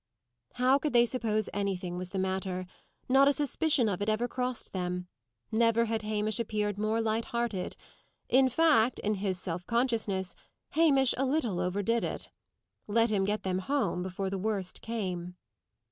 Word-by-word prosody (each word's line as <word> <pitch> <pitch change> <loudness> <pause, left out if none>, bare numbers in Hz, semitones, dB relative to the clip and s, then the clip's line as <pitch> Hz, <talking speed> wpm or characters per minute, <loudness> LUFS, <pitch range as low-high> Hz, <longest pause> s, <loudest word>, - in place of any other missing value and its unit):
How 255 +2 +3
could 300 -1 -2
they 240 0 +6
suppose 220 -4 -1
anything 190 -3 -2
was 180 0 -4
the 195 - -5
matter? 190 -1 -2 0.4
Not 270 +2 +5
a 285 - +5
suspicion 290 -2 +2
of 200 -2 -2
it 205 - 0
ever 220 +3 +1
crossed 250 -1 -3
them. 180 -1 -3 0.4
Never 230 +1 +3
had 225 -1 -1
Hamish 215 0 0
appeared 210 -3 -1
more 215 +1 +1
light 225 0 0
hearted. 235 -6 -2 0.5
In 260 0 +4
fact, 255 -4 +3
in 210 - -1
his 190 -2 -2
self 175 -1 -4
consciousness, 220 -7 0 0.4
Hamish 280 -5 +4
a - - +2
little 255 - 0
overdid 205 +6 0
it. - - -4 0.6
Let 230 +2 +2
him 195 -2 +2
get 210 +2 -1
them 185 -1 -1
home 240 -4 -1
before 190 +1 -3
the 195 - -2
worst 200 -2 -2
came! 180 -6 -4
215 Hz, 160 wpm, -30 LUFS, 190-240 Hz, 0.6 s, they